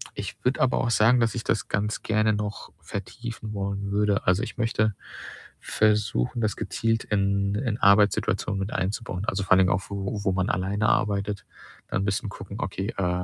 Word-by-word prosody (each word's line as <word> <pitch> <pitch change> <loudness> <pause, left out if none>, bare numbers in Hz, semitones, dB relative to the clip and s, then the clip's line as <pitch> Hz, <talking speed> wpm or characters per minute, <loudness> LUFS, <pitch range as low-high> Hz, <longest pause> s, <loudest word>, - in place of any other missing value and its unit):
ich - - -6
würde 125 +1 +1
aber 130 - +3
auch 120 - 0
sagen, 115 +3 +5
dass 115 - +2
ich 115 - -3
das - - 0
ganz 105 +1 -1
gerne 110 0 +2
noch 105 0 -4
vertiefen 110 +2 -6
wollen 100 0 -3
würde. 105 -1 +1
Also, 90 +3 +3
ich - - -6
möchte 110 -3 +1 0.7
versuchen, 105 - +1
das 110 -2 0
gezielt 115 +4 -1
in 100 -1 +1
in 110 -1 -1
Arbeitssituationen 100 -1 +3
mit 95 +2 -3
einzubauen. 95 0 -2
Also, 95 0 -1
vor - - -11
allen 95 - +6
Dingen 95 0 +4
auch, 90 +1 +1
wo 100 +1 -3
wo 95 - +2
man 95 0 0
alleine 100 +3 +1
arbeitet, 100 -1 0 0.4
dann 95 - -1
bisschen 100 +1 -1
gucken 100 +1 -8
okay, 95 +3 -3
äh, 90 -1 0
100 Hz, 180 wpm, -26 LUFS, 95-110 Hz, 0.7 s, allen